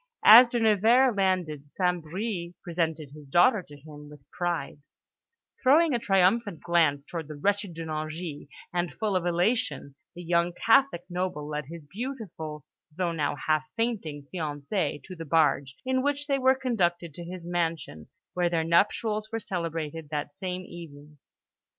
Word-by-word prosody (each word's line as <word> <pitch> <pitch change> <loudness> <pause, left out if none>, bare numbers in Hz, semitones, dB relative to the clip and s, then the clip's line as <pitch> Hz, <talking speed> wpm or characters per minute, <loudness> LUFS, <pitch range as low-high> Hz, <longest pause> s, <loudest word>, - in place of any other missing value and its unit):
As 235 +3 +10
De 240 - -1
Nevers 225 +3 +4
landed 180 -7 -1
St. 180 0 0
Bris 175 +1 -4
presented 160 -5 -2
his 150 -1 -13
daughter 175 - +4
to 145 -4 -14
him 150 0 -12
with 150 0 -15
pride, 170 -5 -3 0.8
throwing 300 +4 +5
a 240 - +1
triumphant 195 -2 +2
glance 160 -5 +2
towards 165 -3 -6
the 155 - -8
wretched 200 +3 -1
De 165 0 -6
Nangis; 155 0 -5 0.3
and, 175 0 -1
full 215 -3 -1
of 180 -1 0
elation, 175 - 0 0.2
the 175 - -8
young 170 +1 +1
Catholic 230 -4 +3
noble 180 -5 -3
led 150 -1 -4
his 165 -1 -10
beautiful 185 - -6 0.3
though 175 +2 -1
now 150 -3 -1
half 155 -1 +2
fainting 195 -12 -2
fiancée 150 0 -2
to 185 - -9
the 165 - -7
barge, 150 -4 +2
in 260 0 +1
which 285 +1 -1
they 275 -2 0
were 260 0 +4
conducted 175 - -1
to 175 - -8
his 175 0 -8
mansion, 165 - -3 0.3
where 175 -1 +1
their 165 -1 0
nuptials 210 +6 +1
were 225 - -2
celebrated 165 -5 -4
that 145 -1 -4
same 185 -1 -4
evening. 150 -4 -12
175 Hz, 155 wpm, -27 LUFS, 155-205 Hz, 0.8 s, As